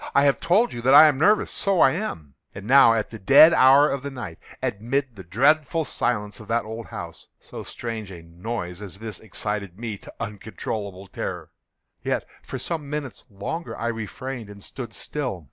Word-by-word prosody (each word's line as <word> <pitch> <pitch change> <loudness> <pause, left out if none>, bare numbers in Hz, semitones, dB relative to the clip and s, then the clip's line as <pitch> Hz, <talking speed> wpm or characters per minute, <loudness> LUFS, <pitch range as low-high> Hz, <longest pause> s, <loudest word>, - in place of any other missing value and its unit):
I 140 - +6
have 140 -1 +3
told 205 +8 +2
you 120 - -5
that 130 +3 +5
I 150 +2 +11
am 145 -3 +1
nervous: 210 +7 +3
so 195 -3 +1
I 130 - +6
am. 105 - -5 0.2
And 100 0 -8
now 125 -2 +7
at 110 -2 -2
the 110 - -8
dead 140 - +8
hour 135 +1 +7
of 140 - -2
the 140 - -5
night, 115 -11 -8 0.2
amid 125 +4 -2
the 95 - -9
dreadful 150 - +2
silence 105 -5 -2
of 110 - -12
that 115 0 0
old 110 +1 -7
house, - - -8
so - - -9
strange 115 -4 -6
a 85 -3 -10
noise 90 +2 -6
as 100 -2 -7
this 110 -2 -7
excited 100 -2 -5
me 110 -3 -5
to - - -12
uncontrollable 100 -2 -5
terror. - - -6 0.5
Yet, - - -1 0.2
for - - -6
some 155 -4 -5
minutes 150 -4 -5
longer 115 - -5
I 115 - -2
refrained 115 +1 -6
and 100 -1 -11
stood 125 -3 -7
still. 130 -11 -4
115 Hz, 190 wpm, -24 LUFS, 100-140 Hz, 0.5 s, I